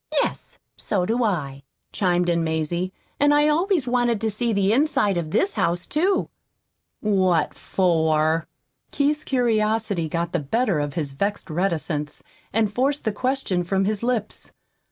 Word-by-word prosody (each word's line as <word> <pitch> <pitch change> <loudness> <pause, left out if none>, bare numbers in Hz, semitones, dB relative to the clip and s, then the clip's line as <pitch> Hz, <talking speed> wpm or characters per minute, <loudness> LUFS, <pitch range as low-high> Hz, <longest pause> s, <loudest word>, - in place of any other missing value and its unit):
"Yes, - - -2 0.2
so 190 -4 -1
do 235 +5 0
I," 145 -10 -2 0.3
chimed 180 -2 +1
in 170 -1 +1
Mazie. 160 +3 -1 0.3
"And 290 0 +4
I 295 +1 +4
always 335 0 +2
wanted 240 -2 +1
to 220 -1 0
see 235 +3 -1
the 200 0 +2
inside 265 -7 +2
of 170 -3 -2
this 385 - +1
house, 175 +1 0
too." 370 +6 +1 0.7
"What 185 -6 +2
for?" 160 -3 +1 0.4
Keith's 295 +1 +1
curiosity 220 - 0
got 170 +1 -2
the - - 0
better 195 - 0
of 145 0 -3
his 150 -5 -2
vexed 200 +4 -3
reticence, 155 -4 -2 0.3
and 215 -1 +1
forced 275 +5 0
the 220 - +1
question 255 -7 -1
from 190 +2 0
his 210 0 -1
lips. 235 -3 -3
200 Hz, 150 wpm, -23 LUFS, 170-245 Hz, 0.7 s, And